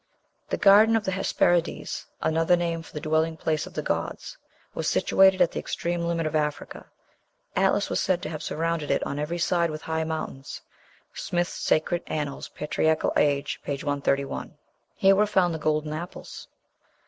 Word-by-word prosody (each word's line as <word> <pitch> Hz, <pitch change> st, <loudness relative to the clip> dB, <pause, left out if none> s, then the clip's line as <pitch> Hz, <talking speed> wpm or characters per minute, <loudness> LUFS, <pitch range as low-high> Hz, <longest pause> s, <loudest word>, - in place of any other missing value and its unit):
"The -, -, -1 dB
Garden 210 Hz, +3 st, +6 dB
of 220 Hz, -1 st, 0 dB
the 190 Hz, -, 0 dB
Hesperides" 175 Hz, -2 st, 0 dB, 0.2 s
(another 165 Hz, +2 st, +3 dB
name 170 Hz, -1 st, -2 dB
for -, -, -14 dB
the 150 Hz, -, -5 dB
dwelling 160 Hz, +1 st, 0 dB
place 155 Hz, -1 st, -1 dB
of -, -, -13 dB
the -, -, -2 dB
gods) -, -, -3 dB, 0.4 s
"was -, -, -3 dB
situated 190 Hz, -1 st, +4 dB
at 170 Hz, -, 0 dB
the -, -, -3 dB
extreme 170 Hz, 0 st, -2 dB
limit 165 Hz, -1 st, -1 dB
of 155 Hz, 0 st, -2 dB
Africa. 150 Hz, -1 st, -3 dB, 0.7 s
Atlas -, -, +2 dB
was -, -, -1 dB
said 185 Hz, -2 st, +1 dB
to -, -, -3 dB
have 155 Hz, -1 st, -5 dB
surrounded 165 Hz, -1 st, -2 dB
it -, -, +1 dB
on 140 Hz, -, -3 dB
every 155 Hz, +4 st, -2 dB
side 170 Hz, 0 st, +1 dB
with 155 Hz, 0 st, -6 dB
high 160 Hz, 0 st, -1 dB
mountains." 155 Hz, -4 st, -5 dB, 0.5 s
(Smith's 175 Hz, 0 st, -2 dB
"Sacred 170 Hz, +2 st, 0 dB
Annals, 145 Hz, -3 st, -4 dB
Patriarchal 155 Hz, +1 st, 0 dB
Age," 145 Hz, -1 st, +1 dB
p. 145 Hz, -, -2 dB
131.) 140 Hz, -1 st, -2 dB, 0.4 s
Here 195 Hz, 0 st, +5 dB
were 210 Hz, +2 st, +3 dB
found 185 Hz, -4 st, +2 dB
the 160 Hz, -, -4 dB
golden 155 Hz, 0 st, 0 dB
apples. 170 Hz, +4 st, -8 dB
160 Hz, 170 wpm, -26 LUFS, 155-175 Hz, 0.7 s, Garden